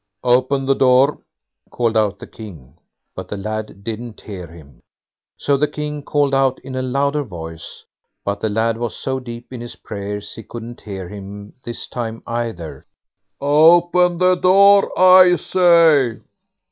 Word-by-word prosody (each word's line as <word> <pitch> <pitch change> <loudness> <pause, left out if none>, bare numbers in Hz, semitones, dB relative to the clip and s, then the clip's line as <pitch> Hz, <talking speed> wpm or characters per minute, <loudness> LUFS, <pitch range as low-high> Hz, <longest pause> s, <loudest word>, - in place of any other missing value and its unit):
"Open 130 +2 +2
the 135 - +3
door!" 130 +2 +3 0.5
called 115 -2 -1
out 105 -2 +1
the - - -10
King; 80 - -12 0.4
but - - -7
the 105 - -6
lad 110 0 -6
didn't 115 +1 -7
hear 95 -5 -8
him. 75 -6 -16 0.6
So 140 -1 +1
the 150 +2 +1
King 150 0 -5
called 145 -1 0
out 135 -1 +2
in 135 - -8
a 130 - -2
louder 140 +3 0
voice, 80 - -9 0.4
but 100 0 -2
the 110 - -1
lad 110 +2 0
was 120 -1 -4
so 130 0 -3
deep 120 0 -10
in 120 - -7
his 120 - -8
prayers 105 0 -6
he - - -9
couldn't 120 +2 -10
hear 95 -3 -7
him 100 +1 -10
this 120 -1 -5
time 115 -2 -6
either. 115 -9 -5 0.6
"OPEN 175 +4 +4
THE 185 +1 +4
DOOR, 200 +2 +5
I 185 -1 +7
SAY!" 165 -8 +3
120 Hz, 155 wpm, -19 LUFS, 105-145 Hz, 0.6 s, I